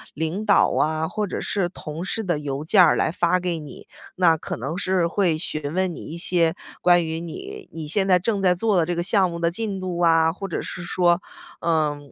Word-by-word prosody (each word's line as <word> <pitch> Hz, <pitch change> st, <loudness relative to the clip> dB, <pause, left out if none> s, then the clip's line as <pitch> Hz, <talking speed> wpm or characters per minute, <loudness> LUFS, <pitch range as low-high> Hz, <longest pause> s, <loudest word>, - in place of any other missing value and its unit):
领 160 Hz, +6 st, -2 dB
导 210 Hz, -2 st, +4 dB
啊， 155 Hz, +1 st, 0 dB
或 210 Hz, +3 st, -3 dB
者 -, -, -4 dB
是 190 Hz, -4 st, -1 dB
同 165 Hz, -2 st, -7 dB
事 225 Hz, +4 st, -2 dB
的 175 Hz, -6 st, -1 dB
邮 140 Hz, -1 st, -4 dB
件 185 Hz, +3 st, +6 dB
儿 -, -, +5 dB
来 -, -, +1 dB
发 175 Hz, +1 st, +1 dB
给 175 Hz, -2 st, -2 dB
你， 150 Hz, -2 st, -11 dB, 0.3 s
那 175 Hz, -3 st, +4 dB
可 -, -, -5 dB
能 135 Hz, +7 st, -4 dB
是 185 Hz, -2 st, +1 dB
会 170 Hz, -2 st, +1 dB
询 155 Hz, -2 st, -3 dB
问 185 Hz, -1 st, 0 dB
你 -, -, -9 dB
一 165 Hz, -, -7 dB
些 170 Hz, -1 st, +2 dB, 0.3 s
关 175 Hz, -1 st, +4 dB
于 160 Hz, -, -4 dB
你 385 Hz, -, -7 dB
你 160 Hz, -2 st, -6 dB
现 190 Hz, +4 st, +1 dB
在 185 Hz, -1 st, +5 dB
正 200 Hz, +2 st, -1 dB
在 180 Hz, -2 st, +3 dB
做 210 Hz, +1 st, +1 dB
的 170 Hz, -, +3 dB
这 175 Hz, +1 st, -2 dB
个 170 Hz, -, -1 dB
项 190 Hz, 0 st, +3 dB
目 170 Hz, -, -5 dB
的 170 Hz, 0 st, +1 dB
进 200 Hz, +1 st, -3 dB
度 180 Hz, -2 st, -4 dB
啊。 165 Hz, -1 st, +4 dB
或 195 Hz, +2 st, -6 dB
者 170 Hz, -, -3 dB
是 -, -, -6 dB
说， 175 Hz, 0 st, +2 dB, 0.4 s
嗯， 150 Hz, -4 st, -1 dB
175 Hz, 245 characters per minute, -23 LUFS, 160-185 Hz, 0.4 s, 件